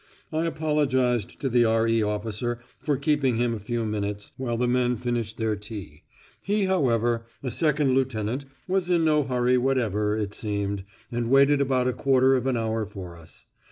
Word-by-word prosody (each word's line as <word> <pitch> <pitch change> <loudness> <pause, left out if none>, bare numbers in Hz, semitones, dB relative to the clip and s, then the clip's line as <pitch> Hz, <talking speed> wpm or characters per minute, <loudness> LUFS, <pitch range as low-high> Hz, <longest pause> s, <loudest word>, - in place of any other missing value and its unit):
I 160 +2 +1
apologised 135 - 0
to 135 - 0
the 120 -1 +4
R.E. 115 0 +2
officer 105 +3 -2 0.2
for 145 -3 0
keeping 140 -3 +1
him 120 0 +1
a 115 - -4
few 115 +2 -2
minutes 105 -1 -3
while 120 -3 -2
the 125 +1 +1
men 125 0 +2
finished 120 -2 -3
their 110 -2 0
tea; 100 -7 -9 0.4
he, 205 0 +1
however, 120 - +1 0.2
a 130 - -2
second 150 -3 +2
lieutenant, 130 0 -1 0.2
was 185 -1 0
in 170 -2 +3
no 150 -1 +4
hurry 125 -2 +2
whatever, 110 -5 +1
it 105 -1 -3
seemed, 100 -2 -3 0.3
and 120 -1 -2
waited 140 +2 +5
about 130 -2 +1
a 125 - +1
quarter 135 0 +3
of 130 0 +1
an 130 -2 +1
hour 110 -1 -1
for 95 -4 -9
us. 85 -1 -14
120 Hz, 175 wpm, -26 LUFS, 110-135 Hz, 0.4 s, waited